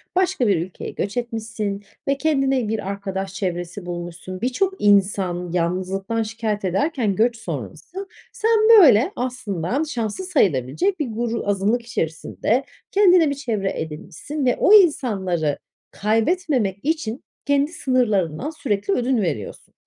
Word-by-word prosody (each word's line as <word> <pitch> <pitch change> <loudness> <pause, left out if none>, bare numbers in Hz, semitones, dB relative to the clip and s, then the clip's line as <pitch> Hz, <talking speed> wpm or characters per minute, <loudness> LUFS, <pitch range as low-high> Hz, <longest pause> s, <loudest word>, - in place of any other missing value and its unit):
başka 365 -9 +2
bir 200 -4 +3
ülkeye 185 - -8
göç 200 +4 -4
etmişsin 225 -4 -3 0.2
ve 275 0 +2
kendine 270 -5 +1
bir 220 -2 -3
arkadaş 195 -1 -4
çevresi 180 -1 -4
bulmuşsun. 175 +1 -6
Birçok 260 +11 0
insan 190 -3 +2
yalnızlıktan 190 +5 -1
şikâyet 215 -2 -3
ederken 220 - 0
göç 230 +3 +2
sonrası, 375 - -7 0.2
sen 455 -2 +2 0.2
böyle 265 - +6
aslında 245 - -2
şanslı 235 - -3
sayılabilecek 300 - +1
bir 300 - -1
gru 230 -1 -3
azınlık 205 +4 +1
içerisinde 220 - -1 0.3
kendine 365 -6 +5
bir 285 - -2
çevre 220 -8 -2
edinmişsin 160 - -5
ve 250 - +3
o 410 - +5
insanları 195 - +3 0.3
kaybetmemek 225 - 0
için 280 -6 -2 0.2
kendi 285 +1 +2
sınırlarından 245 - 0
sürekli 205 -10 -1
ödün 250 0 +1
veriyorsun. 145 - -4
225 Hz, 125 wpm, -22 LUFS, 190-275 Hz, 0.3 s, böyle